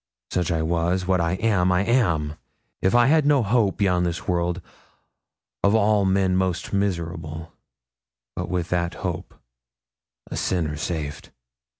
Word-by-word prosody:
Such 90 Hz, -1 st, 0 dB
I 80 Hz, -1 st, 0 dB
was; 85 Hz, +3 st, 0 dB
what 90 Hz, -1 st, +2 dB
I 85 Hz, +1 st, 0 dB
am, 95 Hz, -2 st, +2 dB
I 90 Hz, +2 st, +2 dB
am. 85 Hz, -11 st, +1 dB, 0.5 s
If 95 Hz, +5 st, +2 dB
I 120 Hz, 0 st, +6 dB
had 155 Hz, +4 st, +4 dB
no 145 Hz, -3 st, +3 dB
hope 105 Hz, -2 st, +2 dB
beyond 90 Hz, -4 st, +2 dB
this 85 Hz, 0 st, -3 dB
world, 90 Hz, 0 st, 0 dB, 1.0 s
of 100 Hz, +2 st, +4 dB
all 105 Hz, -2 st, +3 dB
men 95 Hz, -1 st, +2 dB
most 95 Hz, -1 st, -1 dB
miserable; 85 Hz, -4 st, -3 dB, 0.8 s
but -, -, -4 dB
with 90 Hz, -2 st, -2 dB
that 85 Hz, -1 st, -1 dB
hope, -, -, -4 dB, 0.9 s
a -, -, -7 dB
sinner 80 Hz, -5 st, -1 dB
saved.' 75 Hz, -1 st, -4 dB
90 Hz, 140 wpm, -24 LUFS, 85-100 Hz, 1.0 s, I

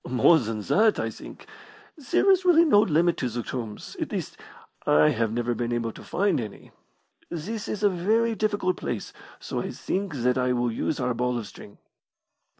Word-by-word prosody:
"More 130 Hz, +7 st, +5 dB
than 110 Hz, -3 st, -4 dB
that, 215 Hz, -, +3 dB
I -, -, -2 dB
think. -, -, -12 dB, 0.5 s
There 305 Hz, +6 st, +2 dB
is 380 Hz, -1 st, +3 dB
really 340 Hz, -2 st, +6 dB
no 240 Hz, -10 st, +5 dB
limit 175 Hz, -3 st, +2 dB
to 125 Hz, -, -1 dB
the 120 Hz, +1 st, -4 dB
tombs 115 Hz, -4 st, -6 dB
at -, -, -3 dB
least, -, -, -4 dB, 0.5 s
I 75 Hz, +1 st, +5 dB
have 110 Hz, -1 st, 0 dB
never 120 Hz, +1 st, -1 dB
been 120 Hz, +1 st, -3 dB
able 115 Hz, -1 st, -1 dB
to -, -, -12 dB
find 200 Hz, -7 st, 0 dB
any. 105 Hz, -3 st, -9 dB, 0.6 s
This 205 Hz, +7 st, -5 dB
is 210 Hz, -, -4 dB
a -, -, +6 dB
very 220 Hz, +6 st, +1 dB
difficult 205 Hz, -4 st, 0 dB
place, 115 Hz, -5 st, -5 dB, 0.3 s
so -, -, -4 dB
I -, -, -4 dB
think 190 Hz, -4 st, -3 dB
that 125 Hz, 0 st, +1 dB
I 125 Hz, 0 st, +1 dB
will 120 Hz, -1 st, 0 dB
use 125 Hz, +6 st, -2 dB
our 125 Hz, -1 st, 0 dB
ball 125 Hz, +1 st, -1 dB
of 115 Hz, -, -4 dB
string." 100 Hz, 0 st, -13 dB
130 Hz, 190 wpm, -26 LUFS, -, 0.6 s, really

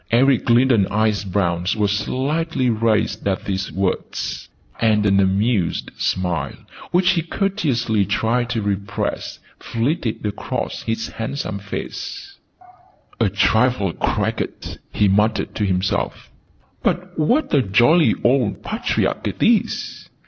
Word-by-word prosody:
Eric 130 Hz, +2 st, +3 dB
Lindon's 120 Hz, -4 st, +4 dB
eye 110 Hz, +1 st, +2 dB, 0.2 s
brows 90 Hz, 0 st, 0 dB
were 105 Hz, -2 st, +1 dB
slightly 130 Hz, +6 st, 0 dB
raised 110 Hz, -2 st, 0 dB
at 95 Hz, -1 st, -1 dB
these 95 Hz, -2 st, -2 dB
words, 95 Hz, +3 st, -3 dB, 0.3 s
and 105 Hz, -2 st, +3 dB
an 100 Hz, -1 st, +4 dB
amused 100 Hz, 0 st, +1 dB
smile, 90 Hz, -3 st, -1 dB, 0.3 s
which 180 Hz, +1 st, +3 dB
he 175 Hz, -3 st, +1 dB
courteously 150 Hz, -, 0 dB
tried 115 Hz, +4 st, 0 dB
to 115 Hz, -3 st, -1 dB
repress, 100 Hz, -1 st, -3 dB, 0.2 s
flitted 115 Hz, -2 st, -2 dB
across 105 Hz, 0 st, -3 dB
his 115 Hz, 0 st, -2 dB
handsome 110 Hz, -3 st, -4 dB
face: 395 Hz, -, -7 dB, 0.8 s
"A 115 Hz, -4 st, +3 dB
trifle 110 Hz, -1 st, +2 dB
cracked!" -, -, -2 dB
he 105 Hz, -, +2 dB
muttered 105 Hz, +3 st, +1 dB
to 105 Hz, -, -1 dB
himself. 95 Hz, 0 st, -1 dB, 0.5 s
"But -, -, -2 dB
what 250 Hz, -, +2 dB
a 140 Hz, -, +5 dB
jolly 120 Hz, -, +4 dB
old 120 Hz, -4 st, +2 dB
patriarch -, -, -1 dB
it -, -, -3 dB
is!" -, -, 0 dB
110 Hz, 120 wpm, -21 LUFS, 100-130 Hz, 0.8 s, a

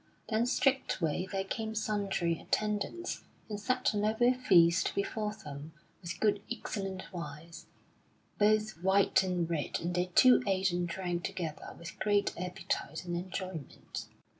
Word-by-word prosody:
Then 225 Hz, +1 st, +2 dB
straightway 190 Hz, -, +1 dB
there 195 Hz, -1 st, 0 dB
came 220 Hz, +2 st, -4 dB
sundry 200 Hz, -6 st, 0 dB
attendants, 210 Hz, -, -2 dB, 0.2 s
and 210 Hz, -2 st, -4 dB
set 255 Hz, +3 st, +1 dB
a -, -, -1 dB
noble 220 Hz, +4 st, +3 dB
feast 175 Hz, -9 st, +4 dB
before 210 Hz, +1 st, -1 dB
them, 150 Hz, -4 st, -9 dB, 0.3 s
with 175 Hz, -1 st, -6 dB
good 210 Hz, -2 st, +2 dB
excellent 195 Hz, -4 st, -4 dB
wines, 165 Hz, 0 st, -7 dB, 0.7 s
both 215 Hz, -3 st, +3 dB
white 190 Hz, +1 st, +4 dB
and 180 Hz, -3 st, 0 dB
red; 165 Hz, -3 st, -1 dB
and 175 Hz, +1 st, -2 dB
they 180 Hz, 0 st, +1 dB
two 255 Hz, -1 st, +8 dB
ate 190 Hz, -1 st, +2 dB
and 175 Hz, 0 st, 0 dB
drank 175 Hz, 0 st, -2 dB
together 175 Hz, -6 st, -5 dB
with 170 Hz, -, -9 dB
great 205 Hz, -1 st, +2 dB
appetite 180 Hz, 0 st, -3 dB
and 175 Hz, -1 st, -2 dB
enjoyment. 180 Hz, -4 st, -5 dB
190 Hz, 140 wpm, -32 LUFS, 175-215 Hz, 0.7 s, two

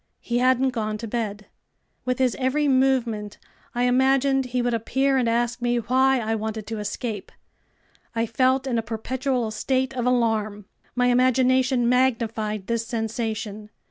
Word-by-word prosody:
He 240 Hz, 0 st, -1 dB
hadn't 255 Hz, +1 st, +3 dB
gone 215 Hz, -3 st, -2 dB
to 230 Hz, -, -6 dB
bed. 210 Hz, -2 st, -3 dB, 0.6 s
With 250 Hz, -1 st, 0 dB
his 255 Hz, -2 st, +1 dB
every 280 Hz, +3 st, +1 dB
movement 250 Hz, -6 st, +1 dB, 0.4 s
I 245 Hz, -, +1 dB
imagined 265 Hz, +2 st, +3 dB
he 250 Hz, 0 st, -1 dB
would 245 Hz, 0 st, 0 dB
appear 265 Hz, +4 st, +1 dB
and 250 Hz, -3 st, +2 dB
ask 240 Hz, +1 st, 0 dB
me 240 Hz, 0 st, +1 dB
why 260 Hz, +3 st, +2 dB
I 225 Hz, -1 st, -1 dB
wanted 220 Hz, -1 st, -3 dB
to 220 Hz, 0 st, -5 dB
escape! 210 Hz, 0 st, -4 dB, 0.8 s
I 230 Hz, 0 st, +1 dB
felt 260 Hz, +3 st, +1 dB
in 245 Hz, -3 st, 0 dB
a -, -, 0 dB
perpetual 240 Hz, +2 st, -2 dB
state 260 Hz, +4 st, -1 dB
of 250 Hz, -1 st, -2 dB
alarm. 220 Hz, -4 st, 0 dB, 0.3 s
My 245 Hz, 0 st, +2 dB
imagination 255 Hz, 0 st, +3 dB
magnified 225 Hz, -5 st, 0 dB
this 230 Hz, +1 st, -2 dB
sensation. 220 Hz, -2 st, -3 dB
240 Hz, 150 wpm, -24 LUFS, 225-260 Hz, 0.8 s, hadn't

